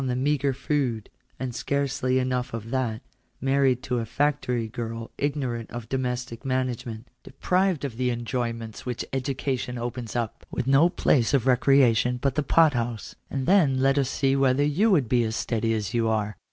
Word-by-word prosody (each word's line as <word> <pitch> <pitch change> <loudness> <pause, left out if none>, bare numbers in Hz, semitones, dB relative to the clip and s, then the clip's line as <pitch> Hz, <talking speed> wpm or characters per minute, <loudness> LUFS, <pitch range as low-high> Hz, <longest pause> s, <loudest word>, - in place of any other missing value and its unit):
fed 130 - -2
on 125 +1 -1
meagre 140 -1 +1
food, 130 -5 -2 0.3
and 130 -2 -3
scarcely 135 0 0
enough 125 -2 -1
of 115 0 -7
that; 125 -4 -1 0.4
married 135 -1 +2
to 125 -2 -1
a - - -2
factory 125 -3 0
girl 115 0 -6
ignorant 130 -5 -2
of 120 -2 -7
domestic 125 -2 -3
management; 125 -3 -2 0.2
deprived 180 +3 0
of 120 -5 -6
the 125 0 +1
enjoyments 115 -2 -3
which 125 -2 -4
education 130 -2 -2
opens 120 -1 -5
up; 115 -3 -3
with - - -3
no 140 +6 +5
place 135 -5 +2
of 130 - +2
recrea 130 -1 +4
tion 125 +3 +1
but 135 +1 0
the 150 - 0
pot 155 +2 +4
house, 120 -2 -3 0.2
and 135 -1 -3
then 155 -9 +4
let 135 +1 +3
us 135 -2 0
see 135 0 +1
whether 135 0 +3
you 160 +10 +2
would 155 - +3
be 120 +1 +2
as 110 0 -2
steady 115 -1 -1
as 105 -4 -2
you 115 -1 +1
are. 105 -2 -1
125 Hz, 180 wpm, -26 LUFS, 115-135 Hz, 0.4 s, no